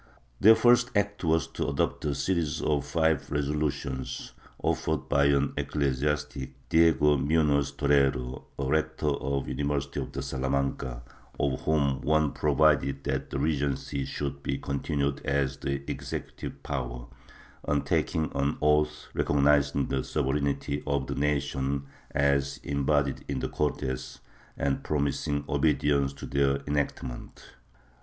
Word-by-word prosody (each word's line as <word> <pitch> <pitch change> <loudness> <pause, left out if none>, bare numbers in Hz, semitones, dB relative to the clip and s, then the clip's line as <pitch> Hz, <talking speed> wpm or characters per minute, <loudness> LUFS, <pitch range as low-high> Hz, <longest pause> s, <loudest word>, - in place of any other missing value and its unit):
Their 110 +3 +8
first 120 +2 +5
act 100 0 0
was 80 -3 +2
to - - -3
adopt 70 +2 -1
a 70 -1 0
series 85 -5 0
of 75 -3 0
five 80 -3 +1
resolutions, 70 -3 -2 0.2
offered 75 -4 -1
by 70 0 +3
an 70 -1 +2
ecclesiastic, 70 -1 -1 0.2
Diego 80 -3 +5
Muhoz 70 0 +2
Torrero, 70 -2 +1
rector 80 +2 0
of 70 -1 -1
the - - -5
University 70 0 -2
of - - -4
Salamanca, 65 -2 -2 0.4
of 70 - +2 0.2
which 70 -3 +2
one 75 0 +2
provided 75 -2 +2
that - - -2
the 70 - -3
Regency 70 -1 -1
should 70 +1 -4
be 70 - -2
continued 70 0 -2
as 70 -1 0
the 70 0 -3
executive - - -6
power, - - -4 0.6
on 75 -1 0
taking 80 -2 0
an 70 +1 0
oath 75 0 +2
recognizing 70 -1 +3
the 65 -1 -1
sovereignty 70 0 -1
of 70 -2 0
the - - -3
nation 70 -1 -1 0.2
as 70 0 +1
embodied 70 -1 0
in 70 - -2
the - - -2
Cortes 65 -3 -2 0.4
and 70 -1 0
promising 70 0 -1
obedience 70 -2 +2
to - - -8
their 70 0 +2
enactments. 70 -4 -3
70 Hz, 125 wpm, -28 LUFS, 70-75 Hz, 0.6 s, Their